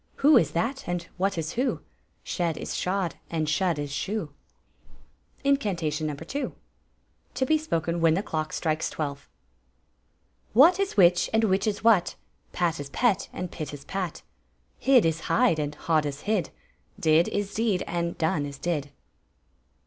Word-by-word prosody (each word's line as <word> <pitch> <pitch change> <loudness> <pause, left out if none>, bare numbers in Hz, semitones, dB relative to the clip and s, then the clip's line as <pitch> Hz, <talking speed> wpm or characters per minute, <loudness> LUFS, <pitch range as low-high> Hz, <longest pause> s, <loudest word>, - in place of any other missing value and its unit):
Who 295 +2 +5
is 160 - +4
that, 235 +11 -2
and 175 -1 -2
what 195 0 0
is 160 0 -2
who; 255 +7 -1 0.4
Shed 170 -4 -2
is - - -5
shod, 185 -2 -1
and 160 -2 -1
shud 165 +2 +1
is 145 -1 -4
shoe! 185 -1 -3 1.1
Incant" 220 -12 +1
'on 155 0 -1
No. 150 - -3
2. 170 - -5 0.8
(To 260 +1 +1
be 315 - +3
spoken 170 - -1
when 165 -1 +4
the 195 - -1
clock 155 -4 -3
strikes 155 -1 -1
twelve.) 140 -2 -5 1.2
What 325 - +7
is 395 - -1
which, 175 -2 +5
and 225 0 +3
which 195 0 +2
is 205 -1 -2
what; 220 -6 +4 0.4
Pat 170 -3 0
is 145 -1 -6
pet, 220 - +1
and 180 -1 -5
pit 155 -3 -6
is 140 0 -13
pat; 185 0 -4 0.6
Hid 265 -6 +5
is 160 -1 +1
hide, 235 -10 +3
and 150 0 -2
hod 155 -1 +1
is 145 0 -6
hid; 210 -3 0 0.5
Did 160 +1 +4
is 205 -1 -2
deed, 215 -5 +1
and 170 0 -2
done 155 -3 0
is 140 -1 -8
did! 150 -3 -2
175 Hz, 165 wpm, -26 LUFS, 155-210 Hz, 1.2 s, What